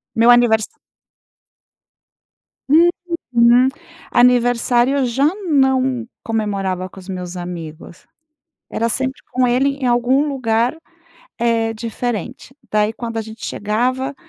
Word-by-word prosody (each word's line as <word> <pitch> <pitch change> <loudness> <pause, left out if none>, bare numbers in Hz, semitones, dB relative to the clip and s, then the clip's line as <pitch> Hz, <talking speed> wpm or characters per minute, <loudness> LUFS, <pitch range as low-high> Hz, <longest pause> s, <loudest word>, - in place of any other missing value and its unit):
Meu 230 +1 +4
aniversário 240 -3 +4 2.6
Uhum. 235 +2 +5 0.4
Aniversário, 245 +1 +3
eu 270 - +1
já 255 +4 0 0.2
não 265 -4 +2 0.2
comemorava 195 -4 -2
com 190 - -13
os 190 +1 -13
meus 180 -1 -6
amigos, 170 -1 -8 0.7
era 230 - -1
sempre 260 +3 -2
com 255 0 +2
ele 255 +3 +2
em 265 -2 -3
algum 250 +5 +2
lugar, 240 -1 0 0.6
eh, 230 -1 +1
diferente. 240 +3 -5 0.2
Daí, 210 +1 +1
quando 230 -1 -6
a 225 - 0
gente 220 0 -9
chegava." 255 +6 -2
235 Hz, 110 wpm, -18 LUFS, 220-255 Hz, 2.6 s, Uhum